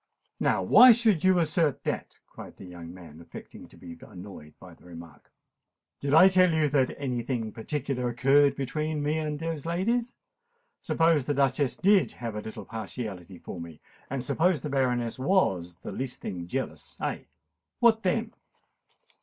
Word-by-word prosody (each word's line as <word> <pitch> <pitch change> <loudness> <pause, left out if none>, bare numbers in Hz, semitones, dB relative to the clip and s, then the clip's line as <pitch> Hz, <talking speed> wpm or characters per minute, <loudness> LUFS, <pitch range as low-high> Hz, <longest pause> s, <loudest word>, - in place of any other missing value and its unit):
"Now - - +1
why 250 -1 +8
should 220 -7 +1
you 185 -1 +4
assert 160 -3 +1
that?" - - -4
cried - - -12
the - - -11
young 85 -2 -10
man, 85 -3 -13
affecting 85 - -12
to - - -19
be 85 -1 -11
annoyed 90 -6 -12
by 90 -2 -13
the - - -22
remark. 85 -4 -13 0.7
"Did 140 - -3
I 160 +5 +8
tell 185 -2 +4
you 155 -2 +2
that 135 -3 +1
any 125 -4 -2
thing 115 -3 -3
particular 125 +1 -3
occurred 135 +4 +3
between 150 +2 -3
me 150 +2 0
and 150 -1 -3
those 165 -2 -4
ladies? 230 +9 -1 0.6
Suppose 165 -5 +1
the 145 - 0
Duchess 135 0 +1
did 200 0 +3
have 115 -2 -6
a 105 - -4
little 110 -1 -8
partiality 105 -5 -7
for 85 - -8
me—and 85 - -9
suppose 165 0 +1
the 150 - -5
Baroness 125 -3 0
was 95 - +1
the - - -9
least 130 -1 -5
thing 90 -3 -6
jealous—eh? - - -5 0.5
What 230 -2 +4
then?" 225 +4 -1
135 Hz, 160 wpm, -27 LUFS, 105-165 Hz, 0.7 s, why